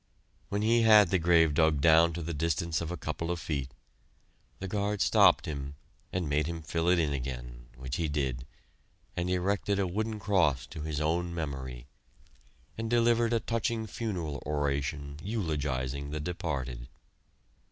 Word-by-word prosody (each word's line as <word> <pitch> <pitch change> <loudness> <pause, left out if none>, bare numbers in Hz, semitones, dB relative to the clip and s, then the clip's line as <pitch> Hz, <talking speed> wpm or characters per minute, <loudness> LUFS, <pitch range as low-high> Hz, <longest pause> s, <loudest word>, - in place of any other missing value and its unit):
When 100 +1 -1
he 115 +2 +4
had 105 -4 +7
the 95 - +3
grave 80 -2 +4
dug 80 -2 +3
down 80 +2 +6
to 85 0 -4
the 85 +2 -3
distance 80 +1 -1
of 85 - -3
a 90 - -4
couple 80 +2 -4
of 90 -1 -1
feet, 70 -5 -3 0.9
the 95 - -5
guard 100 +1 -1
stopped - - +5
him 70 -2 -5 0.4
and 90 -3 -2
made 75 +1 +1
him 85 -1 -5
fill 85 +2 0
it 90 - +5
in 80 -4 +1
again, - - -6
which 65 +1 -4
he 85 - 0
did, 65 -4 -2 0.7
and 90 +1 -1
erected 100 +2 0
a 100 - +1
wooden 110 +4 -2
cross 85 -12 +2
to 75 +4 -8
his 75 -1 -3
own 85 +2 0
memory, 65 -6 -5 0.9
and 115 0 -2
delivered 120 0 +3
a 115 - +2
touching 115 0 -1
funeral 90 - -4
oration 70 0 -2
eulogizing 70 - -2
the 75 +1 -3
departed. 70 -7 -4
80 Hz, 160 wpm, -30 LUFS, 70-95 Hz, 0.9 s, had